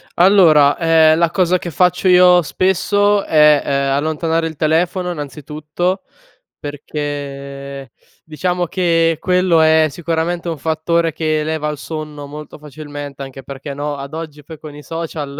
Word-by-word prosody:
Allora, 170 -6 +5
ehm, 160 -1 +4
la 170 0 +2
cosa 185 -1 +2
che 175 - -6
faccio 180 +4 +1
io 180 -1 +6
spesso 200 +4 +1
è, 150 -2 +4
ehm, 140 0 0
allontanare 160 +2 -1
il 160 - -8
telefono 175 +4 0
innanzitutto, 150 +5 -4 0.6
perché, 140 -2 -6 0.3
diciamo, 175 +3 -2
che 165 -2 +1
quello 180 -2 +2
è 160 0 +4
sicuramente 170 +2 -3
un 165 - -4
fattore 165 +2 -1
che 155 -1 -1
leva 155 -1 -2
al 150 -1 -4
sonno 150 -1 -7
molto 150 +1 -10
facilmente 145 -1 -9
anche 135 0 -10
perché, 140 +1 -8
no, 145 +1 -4
ad 140 +2 -8
oggi 150 -3 -8
poi 160 +1 -11
con 150 -2 -10
i 150 - -10
social 155 -4 -6
155 Hz, 145 wpm, -17 LUFS, 145-170 Hz, 0.6 s, io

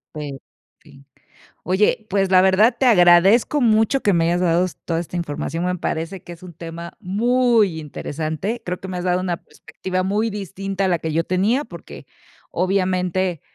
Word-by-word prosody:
en 145 -3 -6 0.4
fin. 140 -3 -19 0.6
Oye, 210 +4 +1
pues, 195 -1 +1
la 185 -1 +7
verdad, 190 +5 +4
te 265 - +1
agradezco 195 +6 +5
mucho 225 +3 +3
que 205 - +2
me 165 -1 +2
hayas 175 +1 +1
dado 175 0 +2 0.2
toda 165 -1 -1
esta 175 +1 -7
información, 165 +1 -3
me 180 0 0
parece 165 +3 -4
que 175 - -9
es 170 - -16
un 180 -2 -10
tema 170 +1 -8
muy 225 -2 +2
interesante, 155 - -4
creo 180 0 -3
que 190 - -8
me 185 - -4
has 175 - -4
dado 180 0 +1
una 180 -2 -2
perspectiva 185 0 -5
muy 210 +4 0
distinta 195 -1 -4
a - - +2
la 175 -3 +1
que 160 -1 -4
yo 165 +1 +1
tenía, 200 - +1
porque - - -11 0.5
obviamente, 185 -2 0
185 Hz, 175 wpm, -21 LUFS, 170-200 Hz, 0.6 s, la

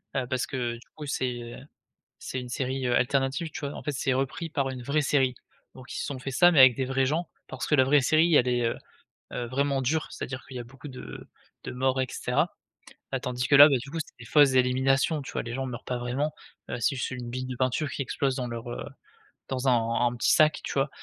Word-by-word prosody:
heu, 130 - 0
parce 130 0 0
que 120 -2 -2
du 120 - -15
coup 150 - -7
c'est, 130 -3 -1
heu, 120 0 -8 0.6
c'est 130 - -5
une 125 - -8
série, 130 0 -2
heu, 120 - +1
alternative, 135 +5 +1
tu - - -7
vois, 140 -2 -4
en - - -8
fait, 150 - -2
c'est 135 -1 0
repris 135 +5 -2
par 140 -3 0
une 130 -2 -6
vraie 140 +5 +1
série, 135 -3 +2 0.4
donc 130 -1 -11
ils - - -4
se - - -2
sont 140 -3 -5
fait 135 +1 -5
ça 175 +7 +6
mais 165 - +2
avec 130 -2 +9
des 130 - 0
vrais 135 0 +1
gens 160 +4 -1 0.2
parce - - -5
que 150 - +4
la 130 - +5
vraie 145 +2 +4
série 155 +4 +3
elle 125 -3 +5
est, 120 -1 +1
heu 115 - -1 0.6
heu, 120 - -3
vraiment 135 +2 0
dure, 155 +5 0
c'est-à-dire 130 0 -6
qu'il 130 - -10
y - - -4
a - - -8
beaucoup 135 +4 -12
de 130 -2 -9 0.4
de - - -4
morts 130 +1 0
et 130 - -1
cetera, - - -1 0.6
bah, 135 - -1
tandis 125 0 -2
que - - +4
là, 145 +2 +11
beh, 140 - +3
du 140 +3 -9
coup, 165 - -4
c'est 155 - -7
des 115 - -11
fausses 145 -1 +5
éliminations, 130 +4 +2
tu - - -8
vois, - - -2
les 115 0 -6
gens 135 +1 -2
meurent 125 -1 -7
pas 125 - -3
vraiment, 130 +5 -2 0.4
heu, - - -2
c'est 135 - +1
juste - - -2
une 125 -2 -6
bille 130 +1 -4
de 130 -1 -5
peinture 130 +3 0
qui - - -5
explose 135 +1 -1
dans 125 -2 -2
leur, 120 0 -6
heu - - -5 0.7
dans 130 0 -2
un 115 -1 +2
un 120 - -2
petit - - +2
sac, 155 0 +4
tu - - -4
vois 135 +1 +1
130 Hz, 260 wpm, -27 LUFS, 125-140 Hz, 0.7 s, là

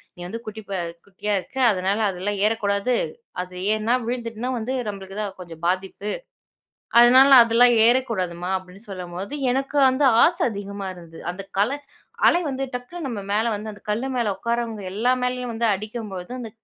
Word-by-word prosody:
நீ - - -18
வந்து 230 +5 -5
குட்டி 220 0 -7 0.2
அ - - -2 0.3
குட்டியா 200 +2 -3
இருக்க, 225 +9 -12
அதனால 195 +2 0
அதெல்லாம் 195 +2 -3
ஏறக்கூடாது, 215 +2 +1 0.5
அது 180 0 -8 0.2
ஏறினா 220 +3 +1
விழுந்துட்டுனா 235 0 -3
வந்து, 240 +4 -3
நம்பளுக்கு 195 -1 -6
தான் 200 -3 -5
கொஞ்சம் 165 -2 -10
பாதிப்பு. 190 +3 -2 0.9
அதுனால 260 +3 +7
அதெல்லாம் 235 +1 +5
ஏறக்கூடாதும்மா" 190 -8 0
அப்படின்னு 185 +3 -14
சொல்லும்போது 185 +6 -6 0.2
எனக்கு 275 +2 -1
வந்து 265 +2 +2 0.2
ஆசை 340 0 +2
அதிகமா 200 -1 -5
இருந்தது, 170 -2 -12
அந்த 195 +2 -8 0.2
கலை 265 +8 +1 0.5
அலை 350 +1 +3
வந்து 270 0 -2
டக்குனு 275 +6 -5
நம்ப 220 -5 -4
மேலே 220 +3 +2
வந்து 215 +1 -6
அந்த - - -17
கல்லு 235 +6 -1
மேலே 230 -4 +1
உட்காரவங்க 235 -2 -2
எல்லா 240 +5 +2
மேலயும் 250 -1 -2
வந்து 230 0 +1
அடிக்கும்போது, 210 -2 -6
அந்த 225 - -6
215 Hz, 160 wpm, -23 LUFS, 195-245 Hz, 0.9 s, அதுனால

